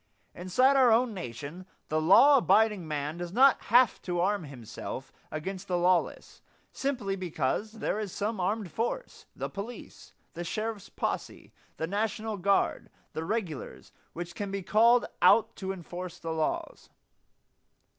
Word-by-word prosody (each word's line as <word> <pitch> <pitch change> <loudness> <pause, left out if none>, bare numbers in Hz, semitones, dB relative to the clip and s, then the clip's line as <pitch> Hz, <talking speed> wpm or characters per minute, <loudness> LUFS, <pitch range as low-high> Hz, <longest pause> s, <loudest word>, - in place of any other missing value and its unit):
Inside 255 +10 +3
our 255 -3 +6
own 235 +1 +3
nation 165 - -7 0.2
the 155 +1 +1
law 275 - +7
abiding 210 -5 +3
man 150 +1 -3
does 175 -1 -5
not 265 +6 +5
have 245 0 +4
to 175 -1 -2
arm 195 0 +1
himself 125 -6 -8 0.2
against 185 +5 -5
the 180 - 0
lawless 180 0 0 0.3
simply 250 -8 -2
because 180 +3 -2
there 220 -2 -2
is 210 -3 -4
some 210 +2 -3
armed 195 0 -1
force 240 - -4
the - - -3
police, 210 +5 -9 0.2
the 175 0 -5
sheriff's 215 +3 -4
posse, - - -4 0.2
the 160 - -1
national 215 +3 -2
guard, 200 +2 +1 0.2
the 160 - -3
regulars 185 - -4 0.2
which 175 0 -6
can 205 +2 -4
be 195 -1 -4
called 230 +5 +4 0.2
out 225 - +5
to 190 -1 -3
enforce 180 -1 -7
the 165 - -5
laws. 160 -1 -3
195 Hz, 145 wpm, -29 LUFS, 175-220 Hz, 0.3 s, law